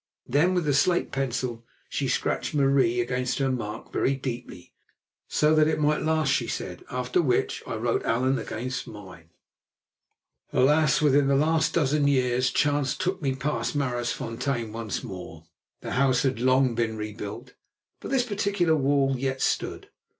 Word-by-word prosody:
Then 165 +8 +2
with 175 -3 0
the 145 - +2
slate 175 +6 +2
pencil 125 -3 -2 0.2
she - - -2
scratched - - -1
"Marie" 135 -4 +3
against 125 +1 -1
her 135 -1 +1
mark 110 -3 -5
very 135 - +1
deeply, 120 -9 -7 0.5
so 150 +1 +2
that 155 -1 +4
it 160 - 0
might 150 0 +2
last, 155 -1 +1
she - - 0
said; - - -5
after 125 +6 0
which 130 -7 0
I - - -3
wrote 115 +1 0
"Allan" 130 +3 +1
against 125 +3 -4
mine. 95 -6 -12 1.2
Alas! 150 +3 +3
Within 145 -1 +4
the 140 - +3
last 155 +3 +2
dozen 145 -2 +2
years 130 -2 +2
chance 145 -3 +1
took 185 0 -2
me 135 -3 0
past 150 +3 -2
Maraisfontein 120 -2 -2
once 115 -2 -4
more. 85 -4 -9 0.4
The - - -6
house 130 -1 +2
had 130 -4 0
long 130 0 +3
been 115 -1 -1
rebuilt, 110 +3 -7 0.5
but - - -7
this 265 -2 +2
particular 200 -7 +1
wall 140 -1 +2
yet 135 0 -2
stood. - - -2
130 Hz, 155 wpm, -26 LUFS, 120-145 Hz, 1.2 s, that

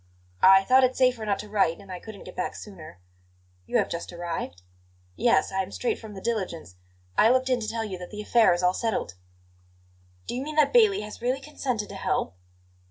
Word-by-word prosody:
"I 190 0 +7
thought 260 +5 +5
it 255 0 +2
safer 250 -4 +2
not 200 - +1
to 210 - -8
write, 200 -5 +1
and 200 -2 -13
I 180 - -6
couldn't 215 -1 -11
get 185 - -11
back 180 - -3
sooner." 170 - -11 0.7
"You - - +1
have - - +2
just 170 - -5
arrived?" 170 - -5 0.5
"Yes; 155 - +2
I 190 0 0
am 190 +1 -6
straight 245 - -2
from 215 -2 -10
the 190 - -8
diligence; 185 - -3 0.4
I 220 - +6
looked 260 +1 +2
in 250 - +2
to 220 - -5
tell 225 0 -2
you 190 -4 -6
that 180 - -8
the 210 0 -7
affair 230 +1 +4
is 175 +1 0
all 180 0 +4
settled." 220 - -2 1.1
"Do - - -5
you 250 - -2
mean 305 +2 -5
that 305 +4 +3
Bailey 435 -5 +5
has 210 +1 -9
really 250 +3 0
consented 260 -6 -3
to - - -8
help?" 140 - -1
210 Hz, 215 wpm, -26 LUFS, 185-250 Hz, 1.1 s, I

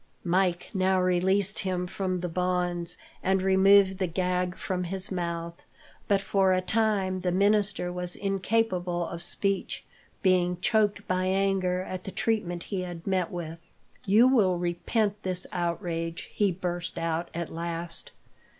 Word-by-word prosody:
Mike 180 0 +1
now 190 -1 +2
released 185 +2 +2
him 185 -2 -1
from 185 0 -2
the 180 - -2
bonds, 180 0 +1 0.2
and 190 0 +1
removed 190 0 +5
the 185 - +1
gag 180 +1 -1
from 180 -1 -2
his 190 +2 +1
mouth, 170 -2 -4 0.4
but 200 -1 +3
for 195 -1 +2
a 185 - +2
time 195 -1 0
the 180 -1 -1
minister 200 -1 +1
was 180 0 -3
incapable 190 -3 0
of 170 0 -5
speech, 195 +3 -1 0.4
being 180 -2 +2
choked 205 0 +1
by 185 0 0
anger 190 -1 +1
at 185 0 -6
the 195 - -5
treatment 180 -6 -1
he 195 -3 -3
had 175 -2 -7
met 185 -3 0
with. 165 -2 -6 0.4
"You 215 +6 +5
will 205 -9 +3
repent 200 +5 -1
this 185 -1 -2
outrage," 170 -2 -3
he 205 -2 +2
burst 175 -1 -4
out, 165 +1 -2
at 170 -1 -4
last. 170 0 -4
185 Hz, 145 wpm, -27 LUFS, 175-195 Hz, 0.4 s, removed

